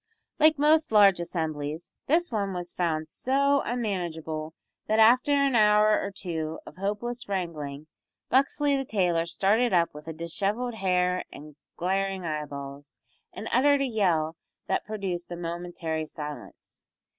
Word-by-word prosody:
Like 310 0 +5
most 305 +1 +3
large 200 -4 +6
assemblies, 160 -2 -4 0.2
this 335 +2 +2
one 200 -3 -1
was 175 -1 -5
found 160 -3 -1
so 280 - +1
unmanageable, 165 -9 -3 0.3
that, 215 - +2
after 240 +5 +5
an 280 -1 +3
hour 210 -1 +5
or 200 - -3
two 165 -5 -4
of 150 - -12
hopeless 220 +5 -3
wrangling, 155 -7 -4 0.4
Buxley 280 +2 +2
the 270 - -1
tailor 175 -8 0
started 215 +6 +2
up 170 -2 +3
with 150 0 -11
dishevelled 200 +9 -2
hair 180 -3 +1
and 150 0 -11 0.2
glaring 190 +1 -1
eyeballs, 145 -2 -6 0.3
and 220 - -7
uttered 285 +3 +4
a - - +2
yell 175 -9 0 0.3
that - - -1
produced 190 -5 -4
a - - -3
momentary 170 -2 -4
silence. 150 -1 -9
190 Hz, 135 wpm, -27 LUFS, 160-230 Hz, 0.4 s, large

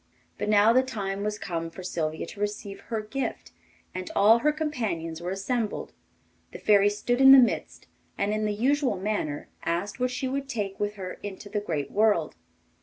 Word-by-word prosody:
But - - -1
now 210 +2 +6
the 255 - +5
time 200 -6 -4
was 210 0 -2
come 165 -4 -4
for 185 +3 -10
Sylvia 160 -3 -2
to 200 - -11
receive 205 -1 -4
her 225 -2 -2
gift, 240 +6 -4 0.4
and 185 0 -5
all 220 +3 +6
her 300 +5 +3
companions 215 - -3
were 175 - -3
assembled; 210 +4 -2 0.6
the - - -8
Fairy 205 -1 +4
stood 245 +5 -1
in 270 0 +10
the - - +11
midst 245 -3 +2 0.3
and 205 +1 0
in 215 0 0
the 210 - 0
usual 260 -1 +1
manner 190 -7 -3
asked 180 +9 -2
what 250 0 +1
she 255 +1 -3
would 275 +1 -3
take 205 -5 -3
with 205 0 -1
her 185 -2 -7
into 205 0 -7
the 210 0 -2
great 155 -8 -3
world. 205 -6 +2
210 Hz, 185 wpm, -27 LUFS, 190-240 Hz, 0.6 s, the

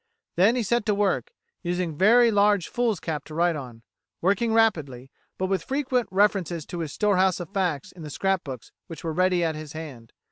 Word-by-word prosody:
Then 195 +7 +4
he 245 - 0
set 235 +3 +1
to 210 - +2
work, 200 -2 0 0.3
using 175 -2 -2
very 230 +7 +5
large 205 -3 +3
foolscap 200 -10 -1
to 155 +1 -10
write 170 0 +2
on, 125 -5 -8 0.4
working 200 +6 +1
rapidly, 150 - +1 0.3
but 190 - -1
with 190 0 0
frequent 260 -4 -1
references 185 -5 +1
to 175 - -6
his 160 -3 -4
storehouse 190 -2 +2
of 175 +2 -8
facts 175 -8 -1
in 180 - -14
the 155 - -7
scrap 195 +4 0
books 130 -6 -8 0.2
which 165 - -9
were 165 -1 -2
ready 185 0 +2
at 160 -1 0
his 155 -1 -8
hand. 140 -8 -9
180 Hz, 190 wpm, -25 LUFS, 155-205 Hz, 0.4 s, very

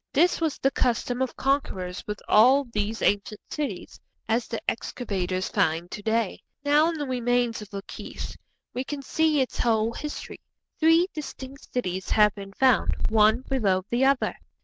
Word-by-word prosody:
This 345 +4 +3
was 320 -3 0
the 270 - +1
custom 245 0 0
of 260 - -1
conquerors 195 -10 -1
with 210 -1 -5
all 255 +6 +6
these 210 +2 -2
ancient 205 +1 +1
cities, 300 -2 -4 0.3
as 230 +1 +1
the 230 - -3
excavators 190 -6 -2
find 165 +2 0
to 210 - -6
day. 225 -1 0 0.2
Now, 300 +3 +4
in 335 - -3
the 295 - -2
remains 245 -2 0
of 210 - -11
Lachish 195 -1 -7 0.4
we 255 - -2
can 280 +1 -6
see 310 0 +2
its 260 - -3
whole 225 -1 +2
history. 300 +3 -6 0.4
Three 325 +2 +5
distinct 275 -3 -8
cities 190 -6 -2
have 210 -1 +5
been 195 -1 -9
found, 260 +2 +3
one 220 +2 +4
below 200 -9 +1
the 245 +3 +3
other. 275 -1 +2
240 Hz, 160 wpm, -26 LUFS, 210-275 Hz, 0.4 s, all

